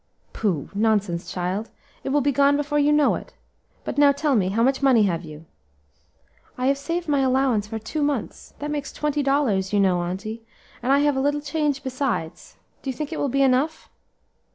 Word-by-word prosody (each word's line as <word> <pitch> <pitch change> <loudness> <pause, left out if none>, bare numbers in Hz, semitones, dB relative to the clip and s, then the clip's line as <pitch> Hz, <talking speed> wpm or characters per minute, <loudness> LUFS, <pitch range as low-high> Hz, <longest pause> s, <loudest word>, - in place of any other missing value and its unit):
"Pooh! 180 -10 -2
nonsense, 205 -5 0
child! 185 +4 -3 0.3
it - - -3
will 290 +2 +2
be 285 +2 +2
gone 280 +1 +3
before 295 0 0
you 290 +1 +3
know 295 -1 +4
it. - - -7 0.5
But - - -3
now 285 -1 +7
tell 285 0 0
me, 190 -4 +2
how 225 +4 +1
much 265 +2 +2
money 260 -5 +5
have 175 -3 0
you?" 155 0 -11 1.1
"I 250 - -2
have 275 +1 +2
saved 335 +4 -3
my 290 -2 +2
allowance 260 -5 +2
for 225 - -4
two 225 +8 -4
months; 285 -6 -3
that 295 +1 -4
makes 290 -2 -3
twenty 300 -1 -1
dollars, 275 -9 +1
you 205 - +2
know, 185 -3 +3
auntie, 195 +6 -5 0.4
and 255 - 0
I 280 +1 +5
have 290 -1 +2
a 265 - 0
little 290 +1 +1
change 295 -2 -1
besides; 255 - -3 0.3
do 275 - -5
you 260 - -3
think 305 +3 -4
it - - -4
will 285 - 0
be 275 +2 +2
enough?" 270 +5 +1
270 Hz, 200 wpm, -23 LUFS, 210-290 Hz, 1.1 s, now